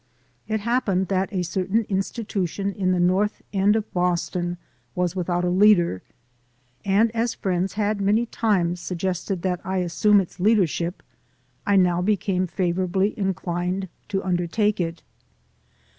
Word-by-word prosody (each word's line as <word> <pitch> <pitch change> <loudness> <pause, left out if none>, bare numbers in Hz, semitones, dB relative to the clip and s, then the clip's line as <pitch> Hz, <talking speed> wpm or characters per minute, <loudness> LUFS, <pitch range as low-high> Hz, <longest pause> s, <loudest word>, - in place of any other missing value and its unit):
It 220 -1 -1
happened 205 -5 0
that 190 +1 0
a 185 -3 -1
certain 190 +5 0
institution 195 -1 -2
in 185 -2 0
the 180 - +1
North 185 +4 +1
End 200 +2 +3
of 220 -1 -3
Boston 175 0 -1 0.4
was 180 0 0
without 175 -1 -1
a - - +1
leader, 180 - +4 0.8
and 210 +3 +3
as 230 +1 -1
friends 185 0 -1
had 210 -1 -1
many 210 +4 +2
times 185 -7 0
suggested 180 +1 -3
that 180 -2 -1
I 190 0 -2
assume 185 +4 +3
its 185 -1 -5
leadership, 180 -4 +1 0.6
I 200 - +4
now 180 -2 +3
became 190 -2 0
favorably 185 +2 0
inclined 185 -1 -2 0.2
to 195 -1 -2
undertake 190 +4 0
it. 165 0 -4
190 Hz, 135 wpm, -24 LUFS, 180-205 Hz, 0.8 s, leader